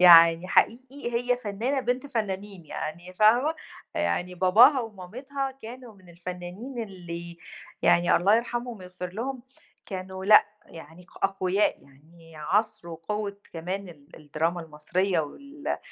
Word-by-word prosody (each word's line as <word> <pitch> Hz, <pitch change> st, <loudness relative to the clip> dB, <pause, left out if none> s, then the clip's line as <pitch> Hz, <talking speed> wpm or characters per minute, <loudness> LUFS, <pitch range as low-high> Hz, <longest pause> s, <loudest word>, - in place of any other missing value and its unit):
يعني 170 Hz, 0 st, +8 dB
حقيقي 255 Hz, +3 st, +1 dB
هي 245 Hz, +1 st, +2 dB
فنانة 240 Hz, +5 st, -1 dB
بنت 255 Hz, +1 st, -1 dB
فنانين 200 Hz, -, -4 dB
يعني 170 Hz, +5 st, -6 dB
فاهمة؟ 240 Hz, -, +4 dB, 0.4 s
يعني 175 Hz, -, -1 dB
باباها 225 Hz, -, +6 dB
ومامتها 250 Hz, +7 st, -5 dB
كانوا 240 Hz, 0 st, -9 dB
من 185 Hz, -2 st, -20 dB
الفنانين 180 Hz, +8 st, -6 dB
اللي 170 Hz, -4 st, -8 dB, 0.4 s
يعني 175 Hz, 0 st, +5 dB
الله 200 Hz, +5 st, +5 dB
يرحمهم 240 Hz, 0 st, -3 dB
ويغفر 180 Hz, 0 st, -7 dB
لهم، 250 Hz, +5 st, -4 dB, 0.4 s
كانوا 190 Hz, 0 st, -6 dB
لأ، 210 Hz, +2 st, +8 dB, 0.2 s
يعني 165 Hz, +2 st, -12 dB, 0.2 s
أقوياء، 195 Hz, +1 st, +1 dB
يعني 160 Hz, +4 st, -18 dB
عصر 190 Hz, +3 st, 0 dB
وقوة 200 Hz, +5 st, -4 dB, 0.2 s
كمان 185 Hz, +4 st, -4 dB
ال 150 Hz, -2 st, -15 dB
الدراما 160 Hz, +3 st, -2 dB
المصرية 165 Hz, +4 st, 0 dB
وال 280 Hz, -, -5 dB
190 Hz, 120 wpm, -27 LUFS, 170-235 Hz, 0.4 s, يعني